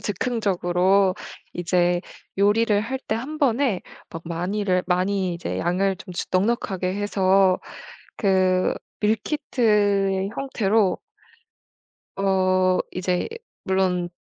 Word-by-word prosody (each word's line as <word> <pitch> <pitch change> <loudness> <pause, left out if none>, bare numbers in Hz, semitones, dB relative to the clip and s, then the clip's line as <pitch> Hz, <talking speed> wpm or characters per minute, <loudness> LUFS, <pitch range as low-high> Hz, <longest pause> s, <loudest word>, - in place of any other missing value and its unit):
즉흥적으로 190 -3 +1 0.4
이제 175 0 +1 0.4
요리를 205 +2 +3
할 260 +5 -3
때 - - +1
1 275 +7 -5
번에 255 - +1 0.3
막 165 - -7
많이를 180 +2 -1
많이 185 +1 0
이제 170 - -4
양을 190 +2 0
좀 180 - -10 0.2
넉넉하게 190 -2 0
해서 195 -2 +2 0.6
그 185 -2 +2 0.3
밀키트의 210 -5 +1
형태로 220 -7 +1 1.2
어 185 -1 +2
이제 180 0 -1 0.4
물론 185 -2 0
195 Hz, 185 characters per minute, -23 LUFS, 185-210 Hz, 1.2 s, 요리를